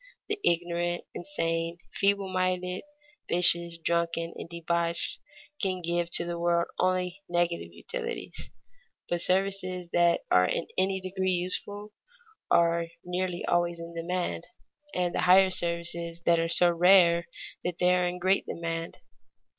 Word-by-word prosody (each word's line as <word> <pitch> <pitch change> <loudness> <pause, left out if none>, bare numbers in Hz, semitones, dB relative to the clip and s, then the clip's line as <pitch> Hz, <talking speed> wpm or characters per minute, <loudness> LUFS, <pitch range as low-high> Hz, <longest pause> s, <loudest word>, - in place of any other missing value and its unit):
The 420 0 -1
ignorant, 175 0 0
insane, 165 -2 -2 0.2
feeble 200 0 +2
minded, 185 0 -1 0.5
vicious, 170 -1 +3
drunken, 170 0 -1
and - - -8
debauched, 170 0 -2 0.4
can 190 -3 0
give 170 0 0
to 170 - +4
the 170 0 -4
world 170 0 +1
only 185 +1 0
negative 175 -1 0
utilities. 475 -2 -6 0.6
But 175 -1 0
services 185 -1 0
that 175 0 +3
are 90 0 +5
in 165 - -1
any 190 0 +1
degree 185 0 -1
useful 205 +4 -2 0.6
are 170 0 +3 0.2
nearly 180 0 -2
always 175 0 +1
in 170 0 -8
demand, 170 - -3 0.5
and 180 -1 0
the - - 0
higher 190 +1 +6
services 170 -1 0
are 165 -1 +3
so 175 +1 +5
rare 170 -1 +5 0.4
that 175 -1 -3
they 180 0 +3
are 180 0 +2
in 175 0 -3
great 190 +2 +1
demand. 165 0 -4
175 Hz, 130 wpm, -28 LUFS, 170-185 Hz, 0.6 s, higher